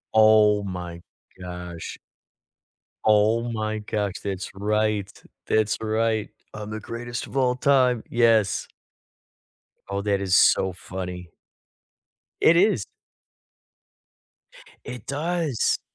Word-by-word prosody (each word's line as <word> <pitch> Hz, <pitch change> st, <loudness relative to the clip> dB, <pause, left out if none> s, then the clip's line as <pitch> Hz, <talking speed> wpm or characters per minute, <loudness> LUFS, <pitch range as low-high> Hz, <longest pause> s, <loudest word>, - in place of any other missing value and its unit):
Oh 110 Hz, -1 st, +6 dB
my 90 Hz, -3 st, -6 dB, 0.4 s
gosh. 90 Hz, -2 st, -7 dB, 1.1 s
Oh 110 Hz, +2 st, +4 dB
my 110 Hz, -1 st, -2 dB
gosh. 105 Hz, -2 st, -2 dB
That's 95 Hz, -2 st, -4 dB
right. 105 Hz, 0 st, 0 dB, 0.4 s
That's 110 Hz, -1 st, +2 dB
right. 110 Hz, 0 st, 0 dB, 0.2 s
"I'm 105 Hz, 0 st, -7 dB
the 110 Hz, 0 st, -5 dB
greatest 120 Hz, +3 st, -6 dB
of -, -, -12 dB
all 125 Hz, -1 st, +2 dB
time." 130 Hz, -3 st, +3 dB
Yes. 115 Hz, -4 st, +3 dB, 1.2 s
Oh, 100 Hz, 0 st, -2 dB
that 100 Hz, -1 st, 0 dB
is 95 Hz, -2 st, +2 dB
so 95 Hz, -, +5 dB
funny. 90 Hz, -1 st, -7 dB, 1.1 s
It 170 Hz, +1 st, +6 dB
is. 185 Hz, -, +3 dB, 2.0 s
It 125 Hz, -4 st, -8 dB
does. 155 Hz, -2 st, 0 dB
110 Hz, 100 wpm, -24 LUFS, 100-115 Hz, 2.0 s, Oh